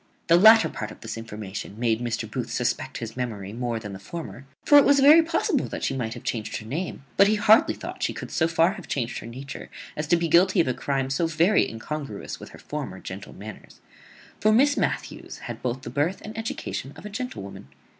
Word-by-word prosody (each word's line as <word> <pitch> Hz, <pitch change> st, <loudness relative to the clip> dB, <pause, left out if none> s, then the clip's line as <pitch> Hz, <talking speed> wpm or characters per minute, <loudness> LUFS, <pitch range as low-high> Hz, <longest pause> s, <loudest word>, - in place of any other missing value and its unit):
The 165 Hz, -, +7 dB
latter 220 Hz, +5 st, +8 dB
part 110 Hz, -, -5 dB
of -, -, -13 dB
this 110 Hz, -, -5 dB
information 105 Hz, -3 st, -7 dB
made 115 Hz, -1 st, +1 dB
Mr. 120 Hz, -2 st, -2 dB
Booth -, -, -4 dB
suspect -, -, -2 dB
his 115 Hz, -1 st, -6 dB
memory 105 Hz, -6 st, -4 dB
more 120 Hz, 0 st, -2 dB
than 105 Hz, -2 st, -7 dB
the 95 Hz, -, -8 dB
former; 135 Hz, -, -8 dB, 0.2 s
for 290 Hz, -, +8 dB
it -, -, +6 dB
was 285 Hz, 0 st, +5 dB
very 295 Hz, +4 st, +8 dB
possible 330 Hz, -, 0 dB
that -, -, -6 dB
she 135 Hz, -, 0 dB
might 115 Hz, -4 st, -3 dB
have -, -, -10 dB
changed 110 Hz, -2 st, -3 dB
her 110 Hz, -, -9 dB
name; 150 Hz, +5 st, -4 dB
but 195 Hz, -, +7 dB
he 215 Hz, -, +3 dB
hardly 215 Hz, +1 st, +5 dB
thought -, -, -8 dB
she -, -, +1 dB
could -, -, -7 dB
so 160 Hz, -, +2 dB
far 165 Hz, +2 st, +3 dB
have 195 Hz, -3 st, -9 dB
changed 120 Hz, -3 st, -2 dB
her -, -, -9 dB
nature 130 Hz, +3 st, -8 dB, 0.3 s
as 150 Hz, 0 st, -3 dB
to 175 Hz, -, +4 dB
be 170 Hz, 0 st, 0 dB
guilty 185 Hz, +3 st, +4 dB
of 165 Hz, -, +3 dB
a 130 Hz, -, +1 dB
crime 135 Hz, 0 st, -2 dB
so 165 Hz, +5 st, +1 dB
very 165 Hz, +5 st, +3 dB
incongruous 125 Hz, 0 st, -6 dB
with -, -, -10 dB
her -, -, -13 dB
former 140 Hz, -11 st, -6 dB
gentle 95 Hz, +2 st, -8 dB
manners: 105 Hz, +2 st, -11 dB, 0.6 s
for 215 Hz, -, +4 dB
Miss 275 Hz, +6 st, +4 dB
Matthews -, -, -3 dB
had -, -, -7 dB
both 125 Hz, +1 st, -3 dB
the 120 Hz, -, -6 dB
birth 150 Hz, +8 st, 0 dB
and 215 Hz, +1 st, -8 dB
education 220 Hz, -, -4 dB
of -, -, -12 dB
a -, -, -5 dB
gentlewoman. 200 Hz, -, -6 dB
140 Hz, 225 wpm, -25 LUFS, -, 0.6 s, latter